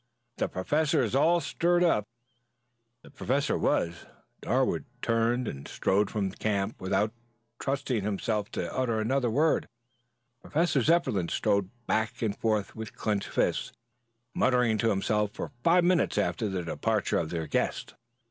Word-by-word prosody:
"The -, -, 0 dB
Professor 150 Hz, -, +1 dB
is 115 Hz, -, -2 dB
all 165 Hz, +6 st, +4 dB
stirred 175 Hz, +2 st, +1 dB
up." 105 Hz, -, +2 dB, 1.0 s
The -, -, -15 dB
Professor 140 Hz, +3 st, 0 dB
was. 85 Hz, 0 st, 0 dB, 0.3 s
Darwood -, -, +1 dB
turned 115 Hz, +1 st, +1 dB
and 70 Hz, 0 st, -6 dB
strode 100 Hz, +2 st, +1 dB
from 100 Hz, -3 st, -1 dB
the 95 Hz, -, -12 dB
camp 100 Hz, -3 st, -1 dB
without 105 Hz, +3 st, 0 dB, 0.5 s
trusting 135 Hz, -5 st, -1 dB
himself 105 Hz, +1 st, -1 dB
to 85 Hz, -, -3 dB
utter 120 Hz, -4 st, 0 dB
another 125 Hz, +3 st, +1 dB
word. 150 Hz, +7 st, +2 dB, 0.7 s
Professor 160 Hz, -3 st, +1 dB
Zepplin 130 Hz, -, +2 dB
strode 100 Hz, -2 st, +1 dB, 0.2 s
back 110 Hz, +1 st, -1 dB
and 105 Hz, -2 st, 0 dB
forth 105 Hz, -3 st, -1 dB
with 110 Hz, -1 st, -7 dB
clenched 105 Hz, -2 st, -1 dB
fists, -, -, 0 dB, 0.6 s
muttering 125 Hz, -4 st, +2 dB
to 115 Hz, -, +2 dB
himself 105 Hz, +1 st, 0 dB
for -, -, -5 dB
five 175 Hz, +1 st, +5 dB
minutes 180 Hz, 0 st, +2 dB
after 110 Hz, -3 st, 0 dB
the 95 Hz, -2 st, -2 dB
departure 85 Hz, -, 0 dB
of 80 Hz, -, -2 dB
their 80 Hz, -1 st, -3 dB
guest. -, -, -2 dB
110 Hz, 145 wpm, -28 LUFS, 100-135 Hz, 1.0 s, five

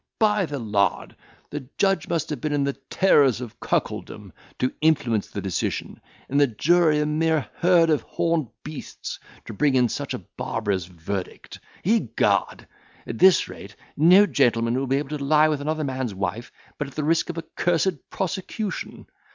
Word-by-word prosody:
By 210 Hz, -4 st, +2 dB
the 145 Hz, -, -4 dB
lard! 105 Hz, -5 st, 0 dB, 0.4 s
the 145 Hz, -3 st, -6 dB
judge 195 Hz, -5 st, +2 dB
must 165 Hz, -2 st, -2 dB
have 145 Hz, -5 st, -4 dB
been 155 Hz, -1 st, -1 dB
in 145 Hz, -1 st, +1 dB
the 140 Hz, 0 st, 0 dB
terrors 140 Hz, -, +3 dB
of 120 Hz, -4 st, -8 dB
cuckoldom, -, -, -3 dB, 0.2 s
to 130 Hz, -, 0 dB
influence 130 Hz, -9 st, +2 dB
the 100 Hz, -, -6 dB
decision; 95 Hz, -3 st, -3 dB, 0.3 s
and 140 Hz, +2 st, +2 dB
the 145 Hz, -, +5 dB
jury 160 Hz, +6 st, +3 dB
a 150 Hz, -, +1 dB
mere 155 Hz, 0 st, +1 dB
herd 170 Hz, -2 st, +4 dB
of 150 Hz, -, +2 dB
horned 165 Hz, -5 st, -1 dB, 0.2 s
beasts, 155 Hz, -1 st, -7 dB, 0.3 s
to -, -, -7 dB
bring 140 Hz, +5 st, +2 dB
in 125 Hz, -2 st, +3 dB
such -, -, -3 dB
a -, -, -9 dB
barbarous 100 Hz, -4 st, -2 dB
verdict. 90 Hz, +2 st, -6 dB, 0.2 s
Egad! 220 Hz, +5 st, +1 dB, 0.4 s
at -, -, -6 dB
this 190 Hz, -1 st, +6 dB
rate, 100 Hz, +1 st, -11 dB, 0.2 s
no 180 Hz, +7 st, +7 dB
gentleman 115 Hz, -, +2 dB
will 135 Hz, +2 st, -1 dB
be 135 Hz, +2 st, +2 dB
able 150 Hz, +1 st, -3 dB
to 140 Hz, -, -5 dB
lie 155 Hz, +2 st, +4 dB
with 150 Hz, -2 st, -1 dB
another 155 Hz, +1 st, -2 dB
man's 130 Hz, -6 st, -3 dB
wife, 100 Hz, +5 st, -4 dB, 0.3 s
but 145 Hz, -, -2 dB
at 135 Hz, -, -13 dB
the 155 Hz, -, -2 dB
risk 160 Hz, +2 st, +1 dB
of 170 Hz, -, -5 dB
a 165 Hz, -, -3 dB
cursed 175 Hz, +2 st, 0 dB
prosecution. 190 Hz, +2 st, -4 dB
145 Hz, 175 wpm, -24 LUFS, 125-165 Hz, 0.4 s, no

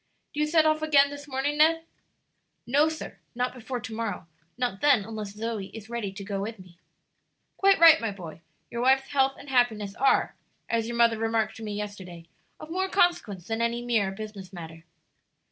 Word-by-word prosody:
Do 295 Hz, -, -4 dB
you 300 Hz, -, +2 dB
set 315 Hz, 0 st, +4 dB
off 310 Hz, 0 st, +2 dB
again 285 Hz, -2 st, +4 dB
this 285 Hz, 0 st, -9 dB
morning, 285 Hz, +2 st, -2 dB
Ned?" 325 Hz, +1 st, +4 dB, 0.8 s
"No, 290 Hz, +6 st, +3 dB
sir; 315 Hz, -, -7 dB, 0.2 s
not 250 Hz, +1 st, -1 dB
before 250 Hz, 0 st, -5 dB
to 225 Hz, -1 st, -7 dB
morrow; 220 Hz, -6 st, -4 dB, 0.3 s
not 245 Hz, -6 st, -2 dB
then 265 Hz, -9 st, +4 dB
unless 215 Hz, -2 st, -6 dB
Zoe 220 Hz, -2 st, -4 dB
is 220 Hz, +1 st, -11 dB
ready 230 Hz, -5 st, -3 dB
to 200 Hz, 0 st, -8 dB
go 195 Hz, -1 st, -3 dB
with 220 Hz, +3 st, -5 dB
me." 180 Hz, -2 st, -16 dB, 0.8 s
"Quite 395 Hz, 0 st, +4 dB
right, 325 Hz, -3 st, +8 dB
my 225 Hz, -, -1 dB
boy, 175 Hz, -5 st, -9 dB, 0.3 s
your 235 Hz, -, -3 dB
wife's 265 Hz, +1 st, +3 dB
health 270 Hz, -1 st, +2 dB
and -, -, -13 dB
happiness 220 Hz, -6 st, +1 dB
are, 270 Hz, -, +2 dB, 0.3 s
as 230 Hz, -1 st, 0 dB
your 235 Hz, 0 st, -4 dB
mother 230 Hz, -1 st, +4 dB
remarked 225 Hz, -1 st, 0 dB
to 225 Hz, -, -9 dB
me 210 Hz, -1 st, -4 dB
yesterday, 190 Hz, -5 st, -7 dB, 0.3 s
of 310 Hz, -, -10 dB
more 375 Hz, +2 st, -1 dB
consequence 290 Hz, -, +1 dB
than 225 Hz, +2 st, -2 dB
any 235 Hz, +1 st, 0 dB
mere 220 Hz, -5 st, +1 dB
business 195 Hz, -2 st, -8 dB
matter." 165 Hz, -2 st, -10 dB
230 Hz, 190 wpm, -27 LUFS, 205-280 Hz, 0.8 s, right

